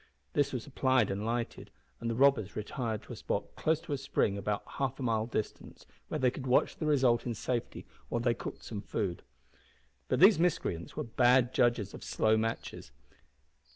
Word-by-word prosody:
This 145 - +2
was 125 -3 -4
applied 130 -5 +2
and 100 +2 -3
lighted, 115 +1 -3 0.3
and 115 - -3
the 115 - -1
robbers 130 -6 +3
retired 110 0 -3
to - - -9
a - - -7
spot - - -3
close 160 0 +1
to 145 - -5
a 140 - -2
spring 105 -6 0
about 100 +1 -2 0.2
half 135 -1 -1
a - - -3
mile 110 -2 +1
distant, 110 -3 -5 0.2
where - - -2
they 130 -4 +3
could 130 0 -7
watch 125 - +3
the 155 - -2
result 130 -5 +3
in 120 - -2
safety 120 +2 -3 0.2
while 120 - 0
they 120 0 +2
cooked - - -7
some 105 -3 -5
food. 95 -4 -3 0.9
But 130 - +1
these 195 +1 +7
miscreants 155 - -1
were - - -2
bad 125 +1 +3
judges 120 -5 +2
of - - -9
slow 110 0 +2
matches! 110 -10 -3
120 Hz, 190 wpm, -31 LUFS, 110-130 Hz, 0.9 s, these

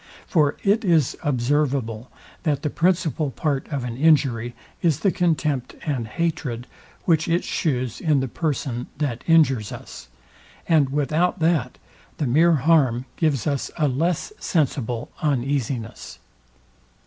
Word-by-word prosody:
For 150 -6 +2
it 205 +3 +3
is 165 - +3
observable, 130 -3 0 0.3
that 150 -4 -1
the 150 - -1
principal 165 -4 +1
part 140 0 -2
of 140 -4 -3
an 120 -2 -4
injury 130 -6 +2 0.3
is 160 -5 +1
the 195 - +3
contempt 155 -8 0
and 130 -7 -2
hatred, 130 -4 -2 0.4
which 160 -3 +2
it 170 +1 +1
shews 125 - -2
in 155 -4 +3
the 130 - -1
person, 130 -4 -2
that 135 -5 -2
injures 135 -10 +4
us; 65 - -9 0.6
and 155 -5 +4
without 150 +6 +1
that, 160 -6 +1 0.4
the 150 - -1
mere 160 +7 +4
harm 135 -5 +3
gives 145 -8 0
us 140 -2 -1
a 155 -3 +2
less 165 - -1
sensible 125 -7 -1
uneasiness. 130 -5 -2
145 Hz, 130 wpm, -23 LUFS, 125-160 Hz, 0.6 s, injures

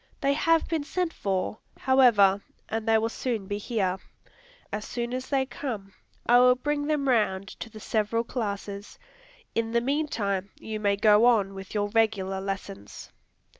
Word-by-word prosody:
They 275 0 +2
have 330 +2 +2
been 320 -3 -1
sent 355 +3 -2
for, 195 +2 -2 0.2
however, 225 -7 +5 0.3
and 225 0 -3
they 225 0 +5
will 220 +1 +1
soon 230 -3 -3
be 205 +1 -3
here. 195 -4 -1 0.7
As 210 - -2
soon 240 +2 -4
as 255 +1 -4
they 270 -2 +2
come, 220 -8 -6 0.3
I 245 +1 +6
will 250 0 +6
bring 290 +2 -2
them 295 -2 0
round 200 -6 +1
to 230 - -6
the 215 - -11
several 220 +2 0
classes. 205 -4 -5 0.6
In 225 0 -1
the 235 - +3
meantime, 230 -9 -1
you 220 -1 -5
may 200 -1 +2
go 210 +2 +5
on 205 -5 +3
with 195 +1 -9
your 205 0 0
regular 205 -4 +1
lessons." 190 - -6
220 Hz, 165 wpm, -27 LUFS, 200-255 Hz, 0.7 s, I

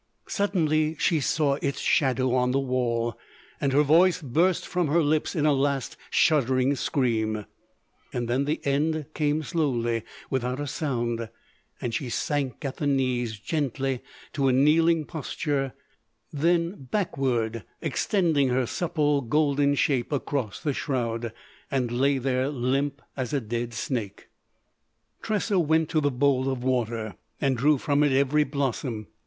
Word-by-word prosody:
Suddenly 160 -6 +1
she 165 - +2
saw 145 0 +1
its 140 - -1
shadow 130 -2 +2
on 125 -1 +2
the 135 +2 +2
wall; 120 -4 -1 0.4
and 140 - +1
her 145 +3 +4
voice 170 +5 +4
burst 165 +6 +1
from 180 -2 0
her 165 +3 +3
lips 150 +4 0
in 150 -3 +1
a 150 - +5
last 140 -1 0
shuddering 130 -3 +3
scream. 110 -6 0 0.7
Then 120 +3 -1
the 150 +2 -1
end 150 +2 +1
came 150 0 0
slowly, 120 -8 0 0.3
without 125 0 -1
a 145 - -2
sound, 120 -6 -2 0.5
and 120 - -3
she 135 -3 -2
sank 140 +1 -2
at 135 - -4
the 145 - -1
knees, 125 -5 0
gently, 135 0 -2 0.3
to 140 -2 +1
a - - +4
kneeling 155 +4 +4
posture, 140 -4 -2 0.6
then 170 0 0
backward, 125 - -1 0.2
extending 165 -9 +1
her 125 0 +1
supple 150 -1 0
golden 145 +2 +2
shape 135 -3 +1
across 135 -5 -2
the 145 - -1
shroud; 120 -4 -2 0.4
and 130 -4 -1
lay 135 +3 +2
there 130 +1 0
limp 140 +1 -1
as 130 -2 -3
a 140 - +2
dead 120 0 -4
snake. 110 -5 -4 0.9
Tressa 210 -2 0
went 160 -1 +2
to 155 -2 +1
the 145 - +2
bowl 135 0 +2
of 130 -2 -3
water 115 -5 -1 0.2
and 135 -2 +1
drew 145 +5 +3
from 145 +2 +1
it 145 -1 +3
every 140 +3 +3
blossom. 130 -5 -2
140 Hz, 145 wpm, -26 LUFS, 125-150 Hz, 0.9 s, a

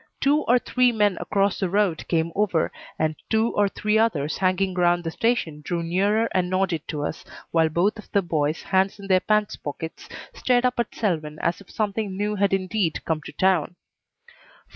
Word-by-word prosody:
Two 290 +2 +3
or 245 - +5
three 250 0 +2
men 210 -4 +2
across 200 -1 0
the 190 -3 0
road 195 -4 0
came 165 -1 0
over, 195 -6 +1 0.3
and 155 0 0
two 220 +1 +2
or 205 -1 +3
three 215 +2 0
others 160 -10 +1
hanging 185 0 +1
around 175 -1 +2
the 165 - -3
station 175 -9 -1
drew 170 +1 -2
nearer 200 +6 +1
and 180 -1 +1
nodded 185 -4 -1
to 150 -2 -3
us, 155 - -4 0.3
while 165 -1 +3
both 190 +7 +1
of 215 - -13
the 200 - +2
boys, 155 -2 -1
hands 190 +1 +1
in 200 - -9
their 190 -1 +4
pants 210 +1 +1
pockets, 160 +2 -7 0.2
stared 250 0 +2
up 250 -1 0
at 235 - -2
Selwyn 155 -8 -2
as 170 +3 0
if 200 - -17
something 205 -2 -2
new 210 +1 -1
had 200 -1 +1
indeed 190 -2 -1
come 160 -1 -1
to - - -9
town. 185 -3 +1
190 Hz, 190 wpm, -24 LUFS, 165-210 Hz, 0.3 s, or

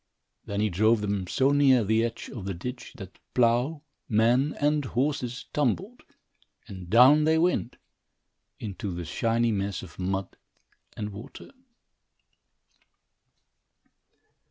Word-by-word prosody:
Then 100 0 -2
he 105 -1 +1
drove 110 +5 +3
them 100 -3 -2
so 135 +8 +2
near 135 -4 +4
the 110 +2 +2
edge 115 -1 -4
of 110 -8 -8
the 95 -2 -3
ditch 125 +8 -7
that 95 -4 -11 0.2
plough, 125 +5 +2 0.3
man, 120 +6 +2
and 150 0 +2
horses 125 -1 -2
tumbled, 165 - -1 0.7
and 95 -3 -9
down 130 +8 +6
they 160 +1 +3
went, 165 -7 0 0.8
into 100 -2 -5
the 85 0 -5
shiny 115 +6 0
mess 100 -1 -2
of - - -13
mud 95 +1 -3 0.6
and 105 -1 -4
water. 105 +6 -11
115 Hz, 120 wpm, -27 LUFS, 100-135 Hz, 0.8 s, down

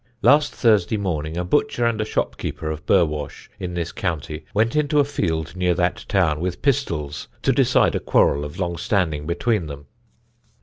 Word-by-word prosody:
Last 145 +5 +5
Thursday 110 -3 +3
morning 80 -5 -3
a 90 - -1
butcher 120 - +1
and 115 -2 +1
a - - -1
shopkeeper 80 -6 -3
of 75 -1 -7
Burwash, 75 -6 0
in 90 -1 -5
this 85 -1 -2
County, 80 -3 -4
went 110 +4 +1
into 150 0 +2
a - - +6
field 85 - -2
near 90 -1 +1
that 90 0 -1
town, 85 -7 +2
with 90 +1 -3
pistols, 85 - -1 0.2
to - - +3
decide - - +3
a - - 0
quarrel 70 +1 +2
of 75 0 -7
long 85 -2 -2
standing 80 -5 0
between 90 +1 0
them. 70 -1 -8
90 Hz, 175 wpm, -22 LUFS, 80-110 Hz, 0.2 s, a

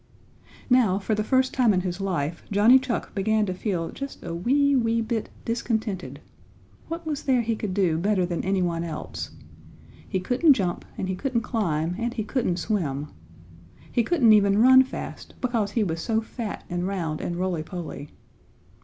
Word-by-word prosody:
Now 245 -7 +4
for 205 +2 -1
the 215 0 0
first 260 +3 +2
time 240 -6 +3
in 185 - +2
his 180 +1 -4
life 170 -4 -2
Johnny 215 +6 +6
Chuck 255 -3 -3
began 215 +2 +1
to 185 - -2
feel 180 -3 -2
just 275 0 -7
a - - -5
wee, 275 +11 +2
wee 230 -2 +2
bit 225 -1 -2 0.2
discontented. 220 -4 -2 0.7
What 330 +1 -5
was 300 -3 -2
there 260 -3 +2
he 225 0 0
could 205 -4 -4
do 175 -5 +2
better 195 0 +2
than 175 -1 -3
any 190 0 +1
one 170 -1 -1
else? 160 -3 -5 0.8
He 190 - 0
couldn't 255 - +4
jump 185 -8 -2
and 190 - -2
he 190 - -2
couldn't 255 +2 -1
climb 175 -8 -1
and 235 +1 -2
he 220 - -1
couldn't 210 -6 -1
swim. 155 -7 -2 0.8
He 240 - +2
couldn't 240 -4 +4
even 200 -1 +4
run 260 +3 +8
fast, 265 - -8
because 230 -5 -1
he 230 - +2
was 165 -4 -2
so 220 +3 +1
fat 225 -1 -6
and 175 +1 -2
round 170 -6 -2
and 175 - -3
rolly 180 -2 -1
poly. 160 -4 -7
210 Hz, 180 wpm, -25 LUFS, 180-240 Hz, 0.8 s, run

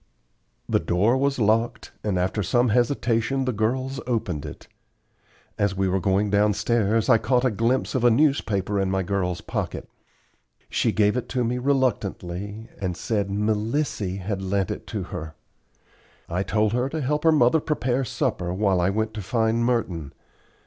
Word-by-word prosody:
The - - +2
door 105 +8 +2
was 140 +1 +1
locked, 115 +1 +1
and 100 -4 0
after 95 +4 0
some 120 +6 +2
hesitation 120 +2 +1
the 130 - 0
girls 130 +6 -1
opened 90 - -2
it. - - -10 0.9
As 100 -2 +1
we 95 0 +1
were 95 +1 +1
going 100 +2 +1
downstairs 105 +1 +2
I 115 -4 +5
caught 125 +3 +1
a 130 - +3
glimpse 115 +5 0
of 130 - 0
a 120 - +7
newspaper 110 -7 +1
in 95 -1 0
my 95 0 0
girl's 90 -2 -1
pocket. - - -4 0.8
She - - +2
gave 105 0 +2
it 125 - -3
to 125 -2 0
me 120 +2 -1
reluctantly, 110 -6 -1
and 90 -2 -2
said 100 -3 -1
"Melissy" 105 0 -1
had 95 0 -4
lent 95 0 -1
it - - -6
to - - -3
her. 80 0 -6 0.9
I 90 +2 -1
told 105 +1 +1
her 125 +2 0
to 155 +2 -3
help 150 +3 -1
her 165 - +6
mother 150 0 +4
prepare 135 -4 -1
supper 90 -6 -2
while 95 -1 +1
I 90 - +2
went 110 +2 -1
to 105 - -5
find 110 +3 +1
Merton. 95 - -1
110 Hz, 165 wpm, -24 LUFS, 95-125 Hz, 0.9 s, a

